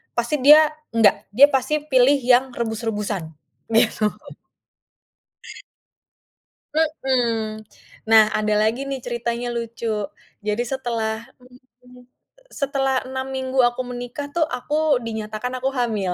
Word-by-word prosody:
pasti 240 +5 -1
dia 300 +3 +7 0.3
enggak, 210 -2 +3
dia 280 +4 +8
pasti 295 +3 0
pilih 260 +1 +5
yang 255 +1 +3
rebus-rebusan, 215 -5 -3 0.5
gitu. 220 -1 +3 2.7
Mhm. 245 -8 0 0.5
Nah 220 -1 +8
ada 215 0 0
lagi 220 +3 +1
nih 275 - -2
ceritanya 240 0 -3
lucu. 235 0 -5 0.6
Jadi 210 +3 0
setelah, 235 -4 -2 0.3
mmm 250 0 -18 0.3
mmm, 250 0 -16 0.5
setelah 270 - -1
6 260 0 -4
minggu 260 0 -4
aku 240 +1 +1
menikah 245 +3 -6
tuh 340 -2 +2
aku 250 +4 -7 0.3
dinyatakan 220 +2 -5
aku 260 +1 -1
hamil. 210 -6 -1
245 Hz, 110 wpm, -22 LUFS, 225-265 Hz, 2.7 s, dia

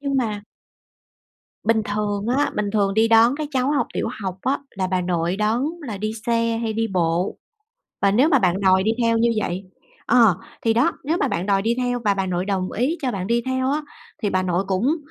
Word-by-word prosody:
Nhưng 280 -1 -1
mà 215 -5 -1 1.2
Bình 220 0 +2
thường 205 -1 -2
á, 290 - +2
bình 210 -1 -1
thường 200 -2 +1
đi 225 +1 +3
đón 230 +3 +5
các 305 -1 -4
cháu 260 -1 0
học 290 -1 +1
tiểu - - -1
học 190 -1 -4
á, 270 +2 +1
là 190 -1 -2
bà 185 0 0
nội 175 0 -1
đón 215 +4 +1 0.3
là 205 -3 -4
đi 215 +2 -2
xe 230 -1 +1
hay 225 - -1
đi 225 +1 0
bộ? 175 +1 0 0.7
Và 200 - +4
nếu 250 +10 +4
mà 285 - +4
bạn 185 -3 +1
đòi 190 -1 +4
đi 220 - +1
theo 230 0 +2
như 235 +1 +3
vậy 185 0 -3 0.4
ờ, 225 -7 +5 0.3
thì 225 - +3
đó, 240 +4 +3
nếu 315 +4 0
mà 280 - 0
bạn 175 0 -2
đòi 195 -1 +2
đi 230 +2 +1
theo 245 -1 -1
và 205 -1 +3
bà 195 -1 -1
nội 180 0 -1
đồng 190 -2 -2
ý 270 +9 0
cho 255 - 0
bạn 190 -2 -3
đi 235 +2 +1
theo 260 0 0
á, 300 +2 0 0.4
thì 205 - +1
bà 185 - +1
nội 180 +1 0
cũng 220 - +1
215 Hz, 225 wpm, -22 LUFS, 190-245 Hz, 1.2 s, đón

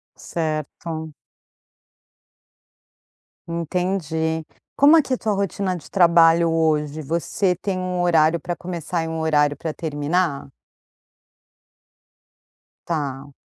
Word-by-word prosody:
Certo. 160 0 -4 2.3
Entendi. 165 -2 -2 0.3
Como 290 +3 +7
é - - +6
que 265 - -3
a - - +1
tua 215 -2 -1
rotina 195 -1 -1
de 165 - -10
trabalho 170 -2 +5
hoje? 155 -2 0
Você 170 +4 0
tem 190 +1 -3
um 180 -1 -2
horário 165 -1 +3
pra 175 +2 -4
começar 170 -1 -4
e - - -4
um 160 0 -3
horário 150 -2 +2
pra 160 -1 -4
terminar? 145 -2 -1 2.4
Tá. 140 -4 -3
165 Hz, 105 wpm, -22 LUFS, 155-180 Hz, 2.4 s, Como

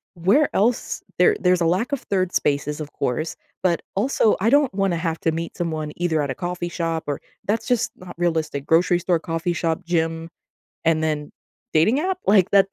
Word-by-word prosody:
where 200 - +3
else 230 +5 +1 0.2
there 435 -2 +5
there's 180 -1 +3
a - - +3
lack 185 - +1
of 275 - -1
3rd 185 -2 -1
spaces, 145 +1 0
of 150 - -7
course, 155 +6 -2 0.3
but 175 -2 +2
also, 220 0 +2
I 220 - +3
don't 285 -4 +4
wanna 195 -3 +1
have 165 -1 -2
to 165 - +2
meet 165 +1 -4
someone 155 -3 -3
either 165 -3 0
at 140 - -2
a 135 - -2
coffee 175 -1 -3
shop 165 -2 -2
or 145 - -3 0.2
that's 215 +3 0
just 245 -3 +1
not 180 -1 -11
realistic, 160 -5 -1
grocery 175 +2 +3
store, 175 -1 +1
coffee 165 +2 -2
shop, 165 -1 -2
gym, 165 -1 -1 0.5
and 160 -1 +2
then 150 -2 -2 0.4
dating 215 - +4
app? 370 +2 -1
Like, 195 -3 +5
that 195 -1 +5
175 Hz, 195 wpm, -22 LUFS, 160-195 Hz, 0.5 s, there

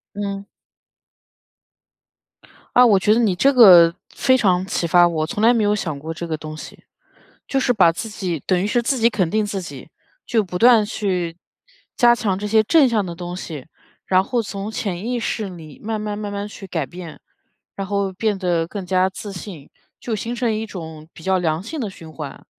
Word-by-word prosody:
嗯。 200 -1 -4 2.3
啊， 250 - +8
我 205 -4 +5
觉 210 +3 +2
得 225 - +3
你 215 -6 +2
这 275 +9 +4
个 180 -9 +8 0.2
非 260 - +3
常 185 -6 +2
启 175 - -1
发 175 +1 +5
我， 160 -2 -1
从 205 +6 -4
来 230 +2 +6
没 230 -3 +1
有 205 0 +2
想 155 -8 -4
过 160 +3 -6
这 170 +2 -6
个 160 -2 -3
东 155 0 -8
西。 - - -11 0.6
就 270 - 0
是 260 - +2
把 170 -6 +5
自 200 +6 -6
己 185 -7 -4
等 185 -2 +2
于 - - 0
是 240 +4 +1
自 265 +3 0
己 230 +1 +3
肯 190 -6 0
定 215 +2 +1
自 200 -1 -3
己， 145 -6 -9 0.4
就 225 -2 +1
不 180 -2 -6
断 235 0 +6
去 185 -6 -2 0.6
加 240 -2 +5
强 200 -5 -1
这 210 - -4
些 220 +1 +4
正 285 +4 +4
向 220 -4 0
的 175 -2 -6
东 175 +1 -6
西， 155 -7 -7 0.4
然 185 0 +3
后 245 +3 -1
从 200 -1 -5
潜 195 -4 -4
意 245 0 -1
识 220 -2 -3
里 160 -5 -12
慢 220 0 -3
慢 210 -1 -4
慢 205 -1 -5
慢 200 +1 -4
去 205 -1 -10
改 160 -6 -3
变， 175 -1 -10 0.6
然 195 -1 -5
后 200 -1 -1
变 205 +2 -1
得 175 -3 0
更 195 +1 -6
加 185 0 +2
自 200 +2 -8
信， 175 -6 -9 0.3
就 235 - -4
形 230 +4 -4
成 235 -2 0
一 215 +1 -3
种 160 -6 -9
比 160 - -14
较 190 +1 +2
良 165 -1 -1
性 310 +9 -6
的 225 -6 -3
循 165 -4 -12
环。 150 -3 -9
195 Hz, 225 characters per minute, -21 LUFS, 175-220 Hz, 2.3 s, 啊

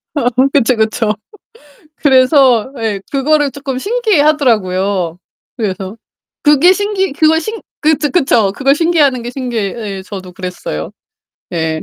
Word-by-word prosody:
어 245 -4 +1 0.2
그쵸, 255 -3 +3
그쵸. 220 -1 0 0.8
그래서 260 -2 +4
예 215 -3 -2
그거를 290 +1 +1
쪼끔 270 -2 -5
신기해하더라고요 240 - +1 0.4
그래서. 200 -2 -4 0.5
그게 295 +5 +6
신기 395 -3 -1
그걸 315 +2 +3
신 440 +6 -5 0.2
그렇죠, 305 -1 +1
그쵸. 235 - +2
그걸 275 +5 +2
신기해하는 300 -6 +2
게 240 - -5
신기해. 240 -6 -3 0.2
예. - - -8
저도 190 -2 -9
그랬어요. 180 - -6 0.6
예. 160 -2 -2
260 Hz, 285 characters per minute, -14 LUFS, 200-300 Hz, 0.8 s, 그게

